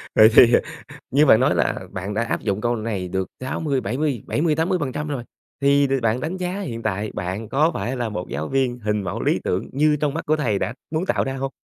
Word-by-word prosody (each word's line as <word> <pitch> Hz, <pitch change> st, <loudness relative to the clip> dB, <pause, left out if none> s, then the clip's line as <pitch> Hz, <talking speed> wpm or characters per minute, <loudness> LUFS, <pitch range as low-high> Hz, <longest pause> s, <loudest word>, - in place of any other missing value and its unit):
Vậy 110 Hz, 0 st, +8 dB
thì, 120 Hz, 0 st, +8 dB
ờ, -, -, +6 dB, 0.5 s
như 145 Hz, +4 st, +4 dB
bạn 110 Hz, -2 st, +6 dB
nói 140 Hz, +3 st, +3 dB
là -, -, 0 dB
bạn 100 Hz, +2 st, -5 dB
đã 115 Hz, -, +1 dB
áp -, -, -2 dB
dụng 100 Hz, -1 st, -1 dB
câu 120 Hz, +1 st, 0 dB
này 105 Hz, -5 st, -3 dB
được 95 Hz, +1 st, -2 dB
60, 135 Hz, +1 st, -1 dB
bảy 115 Hz, +5 st, -3 dB
mươi 145 Hz, -7 st, -1 dB
bảy -, -, -1 dB
mươi, 155 Hz, -2 st, +2 dB
80% 160 Hz, -4 st, -1 dB
rồi. 130 Hz, -5 st, -3 dB, 0.4 s
Thì, 140 Hz, 0 st, +4 dB
đ 135 Hz, -, -3 dB
bạn 115 Hz, +2 st, +1 dB
đánh 165 Hz, +6 st, -3 dB
giá 185 Hz, +2 st, -3 dB
hiện 115 Hz, -11 st, -5 dB
tại 105 Hz, 0 st, -2 dB
bạn 95 Hz, +5 st, -4 dB
có 150 Hz, +7 st, +3 dB
phải 130 Hz, +2 st, -2 dB
là 120 Hz, -2 st, -2 dB
một 90 Hz, -4 st, -5 dB
giáo 75 Hz, +3 st, -4 dB
viên 130 Hz, -2 st, 0 dB
hình 105 Hz, -2 st, -1 dB
mẫu 85 Hz, -, -4 dB
lý -, -, +1 dB
tưởng -, -, -1 dB
như 150 Hz, +2 st, +3 dB
trong 145 Hz, -2 st, 0 dB
mắt -, -, -4 dB
của 155 Hz, +1 st, +3 dB
thầy 110 Hz, -9 st, 0 dB
đã -, -, -2 dB, 0.2 s
muốn 165 Hz, +4 st, -1 dB
tạo -, -, +1 dB
ra 135 Hz, -, -3 dB
hông? 135 Hz, 0 st, -3 dB
125 Hz, 250 wpm, -22 LUFS, 110-150 Hz, 0.5 s, Vậy